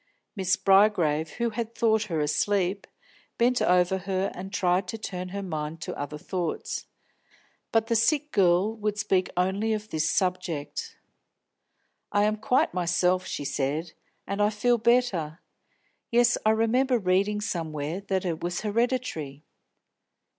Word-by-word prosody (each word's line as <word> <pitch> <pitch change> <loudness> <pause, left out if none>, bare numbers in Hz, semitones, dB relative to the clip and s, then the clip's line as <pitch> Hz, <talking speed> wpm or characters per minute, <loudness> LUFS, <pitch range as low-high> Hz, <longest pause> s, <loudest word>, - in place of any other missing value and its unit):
Miss 190 -2 +1
Bygrave, 175 -6 +3
who 235 -1 -1
had 230 +1 -4
thought 220 -2 +2
her 165 -6 -2
asleep, 190 +5 0 0.5
bent 245 +1 +2
over 180 +1 +3
her 190 +1 -1
and 190 +2 -7
tried 185 -1 +1
to 225 - -4
turn 185 -4 -5
her 200 +2 -5
mind 155 -2 -4
to - - -5
other 145 +1 -5
thoughts. 175 +1 -4 0.8
But 225 -1 +3
the 230 0 0
sick 295 +6 +2
girl 190 +2 +3
would 210 -1 -2
speak 190 -3 +1
only 195 +5 +1
of 215 0 -5
this 160 +1 0
subject. 185 - -2 1.1
"I 205 - +3
am 215 +1 +1
quite 250 0 +1
myself," 180 +1 +1
she 145 - -4
said, 145 +4 -2 0.3
"and 200 +1 -2
I 205 - +4
feel 235 +3 +1
better. 215 -10 +1 0.7
Yes, 240 0 +4
I - - +6
remember 240 +4 +2
reading 200 +1 +1
somewhere 165 -3 -3
that 190 -1 0
it 165 -3 -2
was 175 0 -2
hereditary." 215 - -2
195 Hz, 140 wpm, -27 LUFS, 175-220 Hz, 1.1 s, I